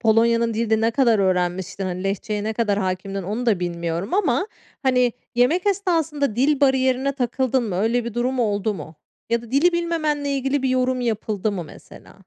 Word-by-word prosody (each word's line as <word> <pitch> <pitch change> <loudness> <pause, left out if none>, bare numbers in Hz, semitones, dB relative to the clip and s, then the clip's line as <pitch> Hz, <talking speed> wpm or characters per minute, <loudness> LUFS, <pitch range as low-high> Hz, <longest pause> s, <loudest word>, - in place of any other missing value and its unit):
Polonya'nın 230 0 +3
dilini 220 -1 +1
ne 225 +1 +2
kadar 235 -4 +3
öğrenmiştin? 185 0 0
Hani, 185 +1 -4
Lehçeye 205 +2 -2
ne 220 - -1
kadar 210 -3 0
hakimdin 190 +1 -3
onu 215 +7 -3
da 200 -6 +2
bilmiyorum 170 - -3
ama, 370 - +1 0.4
hani, 250 -2 +3 0.2
yemek 295 +11 +2
esnasında 325 - 0
dil 280 +3 +2
bariyerine 265 0 +2
takıldın 260 0 0
mı? 195 -5 -3
Öyle 230 +4 +1
bir 235 - -5
durum 250 +2 -1
oldu 205 -1 0
mu? 160 -1 -9 0.4
Ya 235 0 +1
da 235 - -12
dili 295 +7 +4
bilmemenle 310 -4 -1
ilgili 270 0 0
bir 265 - +1
yorum 255 0 +1
yapıldı 215 -3 -1
mı, 180 -4 -4
mesela? 155 - -15
235 Hz, 175 wpm, -22 LUFS, 205-265 Hz, 0.4 s, dili